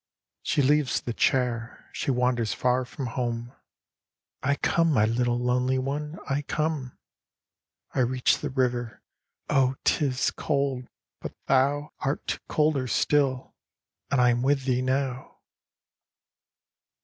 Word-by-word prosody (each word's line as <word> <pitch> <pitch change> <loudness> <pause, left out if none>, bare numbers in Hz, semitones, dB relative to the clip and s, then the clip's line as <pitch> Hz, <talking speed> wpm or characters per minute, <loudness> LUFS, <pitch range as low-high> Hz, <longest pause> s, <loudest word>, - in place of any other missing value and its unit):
" - - -65
She 145 -2 +1
leaves 145 0 +3
the 120 - -4
chair: 120 -2 0
she - - -3
wanders 125 -3 +1
far 125 0 +1
from 130 +2 -6
home: 120 0 -3 0.5
" - - -66 0.3
I 140 +2 +1
come, 165 +3 +2
my 110 -7 +4
little 120 +2 +1
lonely 125 +1 +1
one, 145 +4 -3
I 140 +1 0
come! 150 -3 -2 1.0
I - - -1
reach 125 0 +2
the 150 - -3
river: 125 -3 -1 0.4
oh, 135 -2 +2
't - - +3
is 130 -1 +1
cold, 140 -4 -1 0.3
but - - -7
thou 140 +3 +2
Art 135 +2 -2
colder 150 -4 +1
still, 135 +1 +1 0.6
and 140 - +1
I 125 0 +5
am 120 0 0
with 135 0 +1
thee 125 -1 +1
now." 130 0 -2
130 Hz, 135 wpm, -26 LUFS, 125-140 Hz, 1.0 s, I